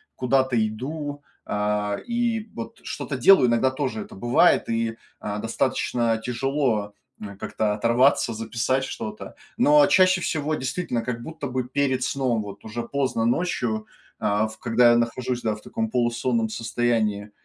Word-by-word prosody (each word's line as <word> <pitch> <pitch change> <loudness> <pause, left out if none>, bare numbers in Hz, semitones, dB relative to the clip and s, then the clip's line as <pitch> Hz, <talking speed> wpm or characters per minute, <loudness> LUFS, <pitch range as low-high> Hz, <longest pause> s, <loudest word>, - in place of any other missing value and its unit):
куда-то 130 0 +1
иду, 145 +6 -5 0.2
а, 105 0 -1
и 235 -2 0
вот 115 - -7
что-то 140 - -4
делаю, 130 +1 +6
иногда 125 +3 +2
тоже 130 -5 -3
это - - -10
бывает 120 +5 +3
и, 115 0 -1 0.2
а, 105 0 -4
достаточно 115 0 0
тяжело, 125 -4 -1 0.3
а, 100 -1 -7
как-то 105 +1 -1
оторваться, 115 +2 +3
записать 115 +4 -1
что-то. 105 0 -7 0.2
Но 150 0 +6
чаще 185 -1 +4
всего, 155 -2 -1
действительно, 130 -3 -2
как 120 -1 -4
будто 160 -1 -6
бы 130 -1 -2
перед 130 -1 0
сном, 130 -4 0
вот 100 -1 -10
уже 115 +2 -4
поздно 130 -3 -1
ночью, 120 -6 -1 0.3
а, 105 +1 +1
в 110 0 -11
когда 120 0 +4
я 120 - +4
нахожусь, 120 +1 -1
да, 110 -2 0
в 105 - -13
таком 110 +1 -3
полусонном 120 -1 +1
состоянии, 110 -3 -1
120 Hz, 150 wpm, -24 LUFS, 110-135 Hz, 0.3 s, делаю